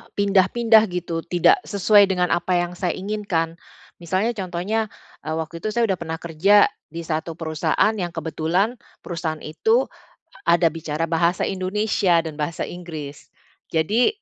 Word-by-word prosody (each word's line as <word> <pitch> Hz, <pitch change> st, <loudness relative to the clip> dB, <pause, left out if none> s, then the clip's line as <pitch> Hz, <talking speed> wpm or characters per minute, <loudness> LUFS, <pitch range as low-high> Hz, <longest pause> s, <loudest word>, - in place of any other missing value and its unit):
pindah-pindah 210 Hz, +3 st, +4 dB
gitu, 175 Hz, -2 st, -3 dB
tidak 180 Hz, -, +4 dB
sesuai 205 Hz, 0 st, +5 dB
dengan 180 Hz, -2 st, 0 dB
apa 175 Hz, +1 st, +1 dB
yang 175 Hz, 0 st, 0 dB
saya 180 Hz, 0 st, -2 dB
inginkan. 185 Hz, -5 st, -2 dB, 0.4 s
Misalnya 185 Hz, +7 st, 0 dB
contohnya, 200 Hz, +2 st, -2 dB, 0.4 s
eee, 160 Hz, -, -1 dB
waktu 165 Hz, +1 st, -5 dB
itu 215 Hz, +3 st, -4 dB
saya 235 Hz, -, +2 dB
udah 185 Hz, -, -2 dB
pernah 165 Hz, -1 st, -4 dB
kerja, 185 Hz, +6 st, +4 dB, 0.3 s
di 170 Hz, -, -4 dB
1 160 Hz, 0 st, -3 dB
perusahaan 160 Hz, +6 st, 0 dB
yang 175 Hz, -3 st, -3 dB
kebetulan 165 Hz, +8 st, -1 dB, 0.2 s
perusahaan 165 Hz, -3 st, -4 dB
itu 445 Hz, -, +1 dB, 0.6 s
ada 170 Hz, 0 st, +4 dB
bicara 160 Hz, 0 st, -3 dB
bahasa 170 Hz, +2 st, +1 dB
Indonesia 190 Hz, -2 st, +1 dB
dan 155 Hz, -2 st, -7 dB
bahasa 155 Hz, +2 st, -2 dB
Inggris. 155 Hz, -5 st, -8 dB, 0.4 s
Jadi, 205 Hz, +10 st, +2 dB
175 Hz, 140 wpm, -22 LUFS, 165-200 Hz, 0.6 s, sesuai